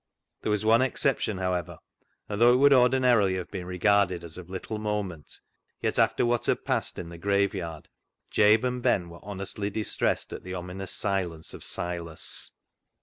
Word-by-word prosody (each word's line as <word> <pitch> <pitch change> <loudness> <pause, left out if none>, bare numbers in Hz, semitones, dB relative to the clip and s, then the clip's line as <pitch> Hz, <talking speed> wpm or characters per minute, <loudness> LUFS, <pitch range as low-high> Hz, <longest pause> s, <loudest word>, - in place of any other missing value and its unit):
There - - -2
was 105 0 0
one 115 +2 +5
excep 130 0 +1
tion, 105 - -2
however, 90 -1 -2 0.5
and 105 +1 -4
though 120 +1 +7
it - - +4
would 140 +1 +6
ordinarily 125 -6 +4
have 90 -2 -5
been 90 -3 -5
regarded 90 -1 +2
as 85 -2 -8
of 90 -1 -9
little 95 +3 -5
moment, 105 -7 -4 0.4
yet - - -1
after - - +3
what 120 0 0
had - - 0
passed - - -1
in 85 - -6
the 85 -1 -10
graveyard, 95 -4 -1 0.4
Jabe 110 +3 +5
and 125 0 -3
Ben 90 -7 +1
were 85 - -11
honestly 100 +1 -4
distressed 105 +1 -1
at - - -6
the 90 0 -6
ominous 90 +2 -6
absence 90 -5 -2
of - - -3
Silas. 85 -2 -3
100 Hz, 175 wpm, -27 LUFS, 90-110 Hz, 0.5 s, though